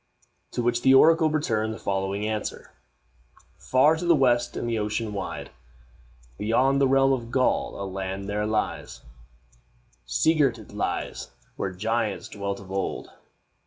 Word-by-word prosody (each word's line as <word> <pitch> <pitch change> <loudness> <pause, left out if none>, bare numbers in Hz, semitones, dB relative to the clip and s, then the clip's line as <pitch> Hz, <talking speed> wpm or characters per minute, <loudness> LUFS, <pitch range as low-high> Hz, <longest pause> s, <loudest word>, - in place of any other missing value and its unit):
To 120 - -1
which 120 0 +1
the 130 +1 +6
oracle 160 +3 +6
returned 110 -8 -1
the - - -8
following 100 +1 -2
answer: 110 -1 -4 0.9
"Far 145 +5 +4
to 175 - -4
the 170 - +6
west, 120 -3 +2
in - - -3
the 115 -2 -1
ocean 105 +1 -2
wide, 85 -7 -5 0.9
Beyond 130 +6 +2
the 135 - +5
realm 135 0 +4
of 120 -3 -3
Gaul 130 -4 0
a 100 - -3
land 95 0 -5
there 105 +1 -1
lies 110 0 -3 1.0
Sea 65 - +3
girt 140 -7 +2
it 110 -2 -13
lies 105 - -3 0.3
where 95 - -3
giants 110 +4 -2
dwelt 100 -1 -4
of 95 -1 -12
old. 95 0 -3
110 Hz, 150 wpm, -25 LUFS, 100-130 Hz, 1.0 s, the